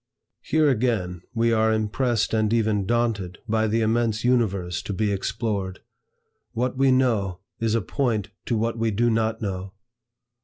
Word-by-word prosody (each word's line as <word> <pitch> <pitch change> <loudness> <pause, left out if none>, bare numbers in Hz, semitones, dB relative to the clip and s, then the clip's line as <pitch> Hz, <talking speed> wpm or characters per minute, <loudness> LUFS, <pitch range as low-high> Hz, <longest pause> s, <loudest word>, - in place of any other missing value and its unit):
Here 155 -1 +2
again 110 - 0
we 115 0 +2
are 110 0 +3
impressed 110 -1 0
and 110 -1 +2
even 110 -4 +1
daunted 115 -6 0
by 110 0 +1
the 115 +2 +1
immense 110 0 +1
Universe 100 -8 +1
to 100 - -5
be 105 +1 0
explored. 100 -1 -2 0.7
"What 125 +2 -1
we 135 +1 +3
know, 115 -8 +2 0.2
is 115 -1 +1
a 115 - +2
point 110 -2 -1 0.2
to 115 - +1
what 115 +1 -1
we 115 0 +1
do 115 +3 +2
not 110 0 0
know." 95 -1 -4
110 Hz, 155 wpm, -24 LUFS, 100-115 Hz, 0.7 s, are